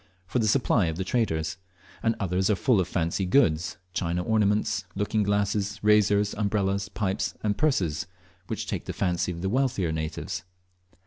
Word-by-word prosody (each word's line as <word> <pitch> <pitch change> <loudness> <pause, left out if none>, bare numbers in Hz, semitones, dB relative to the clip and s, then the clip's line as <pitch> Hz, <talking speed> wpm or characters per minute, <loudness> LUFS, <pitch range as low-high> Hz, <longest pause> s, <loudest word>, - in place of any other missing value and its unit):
for 110 +7 -1
the 110 - +2
supply 110 -4 +3
of 80 0 -3
the 95 - -1
traders; 80 -8 -1 0.4
and 115 0 +1
others 95 +1 0
are 105 - +4
full 115 +2 +3
of 90 - -2
fancy 85 +1 -1
goods, 90 - +2 0.2
china 90 0 -1
ornaments, 105 -1 +1
looking 105 +2 0
glasses, 100 0 0
razors, 105 -1 +4
umbrellas, 100 -1 0
pipes, 100 -2 -2
and 105 -1 +1
purses, 95 - 0 0.4
which - - -3
take - - -4
the - - -4
fancy 90 -2 0
of 85 0 -6
the - - +1
wealthier 125 -8 +1
natives. 80 +4 -4
100 Hz, 165 wpm, -27 LUFS, 90-105 Hz, 0.4 s, are